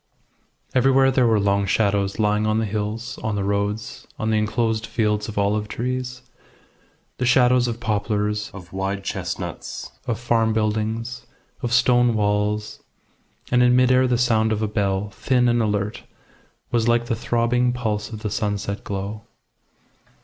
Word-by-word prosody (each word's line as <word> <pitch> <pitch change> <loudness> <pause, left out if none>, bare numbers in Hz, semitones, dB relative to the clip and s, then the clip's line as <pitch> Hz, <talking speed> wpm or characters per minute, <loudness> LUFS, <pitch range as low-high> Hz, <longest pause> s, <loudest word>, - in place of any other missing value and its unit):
Everywhere 135 +1 +4
there 130 -2 +3
were 110 -2 +3
long 100 0 +1
shadows 100 -1 +1
lying 105 0 +1
on 110 0 +1
the 110 - +1
hills, 110 +3 -4
on 110 -1 -2
the 100 - -1
roads, 100 +2 -2
on 110 0 -1
the 110 - +2
enclosed 110 +1 0
fields 105 -2 0
of 105 - -8
olive 105 +1 +1
trees; 125 +2 -4 1.0
the 125 - 0
shadows 125 -1 +4
of 115 -1 -3
poplars, 105 -1 -1
of 90 -2 -12
wide 95 +1 -2
chestnuts, - - -5 0.2
of 115 -2 -1
farm 115 -2 +1
buildings, 110 +3 -2 0.3
of 120 - -2
stone 120 -1 +4
walls; 105 0 0 0.7
and 125 0 +4
in 125 0 +5
mid 125 0 +4
air 130 0 +4
the 125 -1 +2
sound 110 -3 +2
of 110 0 0
a - - +1
bell, 100 -1 -1
thin 125 +5 +1
and 120 0 +2
alert, 105 0 -1 0.7
was 115 -1 +1
like 120 0 +3
the 120 -1 -1
throbbing 120 +2 +1
pulse 110 -4 -2
of 110 -2 -8
the 105 - -2
sunset 105 -2 -2
glow. 100 +3 -5
110 Hz, 155 wpm, -22 LUFS, 105-120 Hz, 1.0 s, in